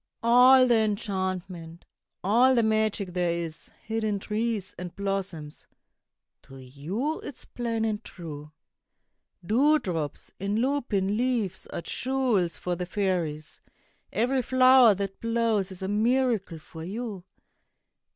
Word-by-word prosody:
All 250 +2 +7
the 240 -2 +4
enchantment, 185 -5 -3 0.4
all 240 +7 +4
the 235 - +3
magic 215 -4 0
there 175 -2 0
is 165 -2 -6
Hid 225 0 -3
in 210 -2 0
trees 210 -1 -3
and 180 -1 -7
blossoms, 195 -6 -4 0.7
to 135 0 -14
you 155 - -4
is 285 - -9
plain 230 -2 -2
and 215 0 -2
true. 150 -4 -9 0.9
Dewdrops 210 - +1
in 200 +2 -2
lupin 230 -7 0
leaves 230 -7 -1
are - - -5
jewels 245 -10 0
for 180 -1 -2
the 180 0 -5
fairies; 175 -6 -2 0.5
Every 250 +5 +1
flower 255 -3 +6
that 195 0 -5
blows 230 -4 0
is 190 0 -8
a - - -2
miracle 220 -3 +1
for 160 +1 -11
you. 205 0 -5
205 Hz, 120 wpm, -27 LUFS, 180-235 Hz, 0.9 s, All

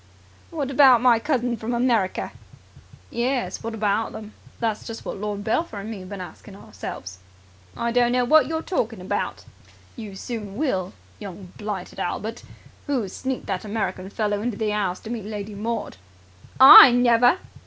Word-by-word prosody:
"What 290 -5 -4
about 265 -3 +6
my 240 -1 +4
cousins 245 -3 -1
from 235 +2 -3
America?" 235 -6 0 0.8
"Yes, 245 +1 -2
what 230 0 -5
about 215 +1 -1
them? 215 -1 -9 0.3
That's 225 -2 -2
just 225 0 -8
what - - -5
Lord 205 0 -4
Belpher 225 +1 -1
and 210 +3 -6
me 215 - -6
have 185 0 -10
been 200 -1 -7
asking 190 +2 -10
ourselves." 95 - -9 0.6
"I 235 0 -1
don't 240 0 +3
know 250 0 +2
wot 310 +5 +5
you're 320 0 -3
talking 230 - -2
about." 180 - -4 0.5
"You 215 -5 -8
soon 210 -1 -6
will, 195 - -1 0.3
young 190 -2 -9
blighted 205 -4 -6
Albert! 220 +5 -4 0.5
Who 260 -8 -1
sneaked 260 +6 -4
that 190 -2 -3
American 200 -3 -3
fellow 205 -1 -2
into 230 -2 -3
the 215 -1 -1
'ouse 195 -4 -1
to 225 - -8
meet 225 -4 -5
Lady 210 0 -6
Maud?" 220 - -4 0.6
"I 265 0 +12
never!" 245 +4 +4
225 Hz, 165 wpm, -23 LUFS, 200-245 Hz, 0.8 s, I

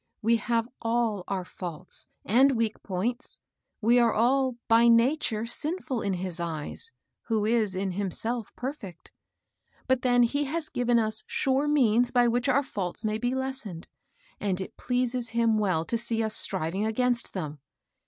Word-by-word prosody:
We 230 +2 +4
have 230 +1 0
all 225 -4 0
our 190 -2 -2
faults 180 -1 -5 0.2
and 265 +7 +5
weak 225 -1 -1
points. 225 +8 -3 0.4
We 235 +3 +4
are 235 -1 +4
all, 255 +3 +2
by 230 +1 +5
nature, 230 -1 +3
sinful 290 0 -1
in 200 -1 -1
his 180 -1 -4
eyes, 165 - -4 0.4
who 220 -2 +1
is, 215 -4 +1
in 190 0 -1
himself, 205 +5 -3
perfect; 245 - -7 0.8
but 260 -1 +2
then 245 -1 +4
he 285 +5 +1
has 310 +3 -3
given 245 -1 +1
us 220 -1 0
sure 270 +2 +1
means 245 -5 +3
by 245 -1 +3
which 245 +3 +1
our 275 +2 +3
faults 200 -4 -3
may 215 0 0
be 245 +2 -1
les 265 0 -2
sened, 175 -6 -8 0.5
and 195 -3 -1
it 190 - -6
pleases 250 -1 -1
him 225 -2 +3
well 185 -6 +1
to 230 - -1
see 225 -1 +1
us 220 0 0
striving 190 +1 +2
against 235 +2 0
them. 155 -6 -5
230 Hz, 165 wpm, -27 LUFS, 200-250 Hz, 0.8 s, and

